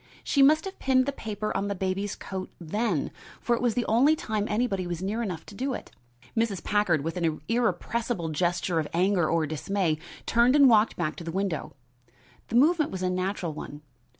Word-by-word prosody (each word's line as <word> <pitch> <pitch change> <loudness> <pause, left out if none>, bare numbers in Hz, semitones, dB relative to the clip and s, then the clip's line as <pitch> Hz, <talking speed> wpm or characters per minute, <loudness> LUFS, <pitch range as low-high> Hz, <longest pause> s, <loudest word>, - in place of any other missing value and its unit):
She 280 - +2
must 310 +5 +5
have 385 - -7
pinned 260 -1 +3
the 280 - -1
paper 215 -5 -4
on 195 +1 0
the 200 - -2
baby's 190 +2 -2
coat 190 -1 -6
then, 175 -1 -1 0.3
for 240 - +1
it - - -4
was 240 -3 +1
the 245 -2 0
only 265 +8 +4
time 215 -7 -2
anybody 210 -5 0
was 175 +1 -4
near 210 +5 -1
enough 185 -8 -4
to - - -12
do 260 +4 -2
it." - - -9 0.4
Mrs. 225 -6 0
Packard, 195 -8 +2
with 165 +3 -3
an 165 -3 0
irrepressible 230 -4 -1
gesture 175 +1 0
of 155 - -2
anger 180 -2 +2
or 165 -1 +2
dismay, 160 +1 -1 0.3
turned 240 +3 +4
and 285 -2 +7
walked 220 -2 +4
back 155 -3 -2
to - - -7
the 165 - -4
window. 180 -7 -2 0.7
The - - -4
movement 305 +4 +4
was 185 -1 -5
a 185 - +1
natural 185 -2 -2
one. 150 0 -8
200 Hz, 200 wpm, -27 LUFS, 175-235 Hz, 0.7 s, and